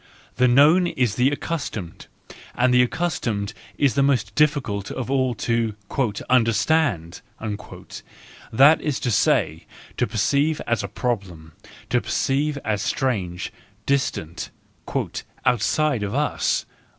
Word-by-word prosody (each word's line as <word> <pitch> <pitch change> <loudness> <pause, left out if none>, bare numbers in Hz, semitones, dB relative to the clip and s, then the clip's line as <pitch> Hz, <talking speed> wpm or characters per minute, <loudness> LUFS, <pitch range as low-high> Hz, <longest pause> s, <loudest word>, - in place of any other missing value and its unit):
The 125 - +4
known 150 +8 +5
is 125 -10 0
the 125 +4 +3
accustomed, 140 - -5 0.5
and 125 0 +3
the 125 - +6
accustomed 120 -8 -1 0.2
is 140 -3 +3
the 140 - +2
most 125 -8 +1
difficult 125 -9 +1
of 130 0 -4
all 130 -3 +1
to 115 -1 -1 0.5
"understand," 115 - +2 1.3
that 140 +7 +6
is 150 -4 -1
to 125 - -1
say, 80 -5 +1 0.3
to - - +1
perceive 150 +2 +1
as 120 -3 0
a 100 - -4
problem, 95 -8 -4 0.4
to - - +3
perceive 145 +2 0
as 105 -2 0
strange, 100 -10 -2 0.3
distant, 130 - -1 0.5
" - - -5
outside 125 +2 +2
of 105 +3 -3
us." 145 +1 0
125 Hz, 120 wpm, -23 LUFS, 105-140 Hz, 1.3 s, the